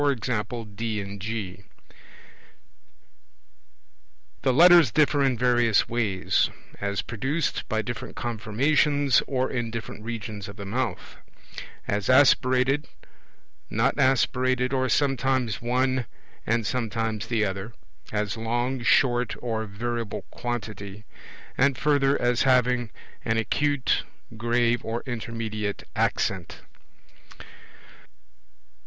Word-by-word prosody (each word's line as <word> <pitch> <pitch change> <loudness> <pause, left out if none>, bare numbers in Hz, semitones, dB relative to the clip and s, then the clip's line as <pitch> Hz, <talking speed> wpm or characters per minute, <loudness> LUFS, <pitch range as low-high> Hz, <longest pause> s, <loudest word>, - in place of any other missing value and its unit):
D 110 0 -2
and 100 0 -7
G. 100 -3 -4 2.8
The 130 - +2
Letters 170 -1 +7
differ 145 0 +3
in 130 -3 +2
various 120 -3 +3
ways: 110 -6 +1 0.3
as 100 0 -2
produced 135 +7 -2
by 110 -2 0
different 120 +1 -6
conformations 135 +5 +2
or 130 -1 -1
in 120 -3 -2
different 115 -2 -7
regions 110 -3 -5
of 100 - -9
the 100 -1 -8
mouth; 120 +4 -3 0.7
as 100 +2 -1
aspirated, 130 +1 +4 0.8
not - - +1
aspirated, 130 -1 +2
or 130 -1 +1
sometimes 130 -4 +1
one 130 0 0 0.4
and 115 0 +1
sometimes 115 -2 -2
the 110 -2 +1
other; 95 +3 -4 0.4
as 105 -1 -1
long, 120 +3 -1
short, 120 0 +3
or 115 -2 -3
of 110 - -6
variable 115 +1 -4
quantity; 110 -3 -5 0.5
and 135 0 +3
further 145 -2 +2
as 120 0 +1
having 125 -2 +3 0.3
an 110 - 0
acute 145 +4 +1 0.3
grave, 120 +1 +1
or 115 +1 -3
intermediate 110 -4 -4
accent. - - -1
120 Hz, 100 wpm, -26 LUFS, 110-130 Hz, 2.8 s, Letters